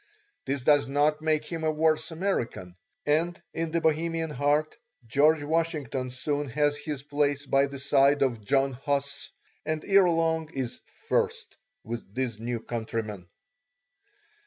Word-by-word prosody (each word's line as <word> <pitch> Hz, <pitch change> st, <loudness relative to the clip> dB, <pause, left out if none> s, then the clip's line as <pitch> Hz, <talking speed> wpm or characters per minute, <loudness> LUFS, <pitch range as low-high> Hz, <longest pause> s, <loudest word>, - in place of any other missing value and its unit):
This 135 Hz, 0 st, -1 dB
does 145 Hz, 0 st, +4 dB
not 150 Hz, +2 st, +2 dB
make 155 Hz, -1 st, +1 dB
him 165 Hz, 0 st, -5 dB
a 155 Hz, -, +2 dB
worse 155 Hz, +1 st, +2 dB
American, 160 Hz, -, -2 dB, 0.3 s
and 165 Hz, +4 st, +1 dB
in 165 Hz, 0 st, -2 dB
the 165 Hz, +1 st, 0 dB
Bohemian 165 Hz, 0 st, 0 dB
heart 150 Hz, +1 st, +1 dB, 0.3 s
George 145 Hz, +6 st, +3 dB
Washington 150 Hz, -4 st, -1 dB
soon 145 Hz, +3 st, -2 dB
has 145 Hz, +2 st, +2 dB
his 145 Hz, -2 st, -5 dB
place 145 Hz, -1 st, 0 dB
by 135 Hz, +1 st, +3 dB
the 140 Hz, 0 st, -7 dB
side 140 Hz, +1 st, +3 dB
of 120 Hz, -5 st, -1 dB
John 135 Hz, +4 st, +2 dB
Huss, 140 Hz, +2 st, -2 dB, 0.3 s
and 155 Hz, 0 st, -3 dB
ere 195 Hz, -2 st, +5 dB
long 165 Hz, -1 st, +1 dB
is 130 Hz, -3 st, -3 dB, 0.3 s
"first" 460 Hz, 0 st, 0 dB, 0.3 s
with 115 Hz, -4 st, -7 dB
these 125 Hz, -4 st, -2 dB
new 120 Hz, +1 st, -3 dB
countrymen. 110 Hz, -5 st, -4 dB
145 Hz, 140 wpm, -27 LUFS, 135-160 Hz, 0.3 s, ere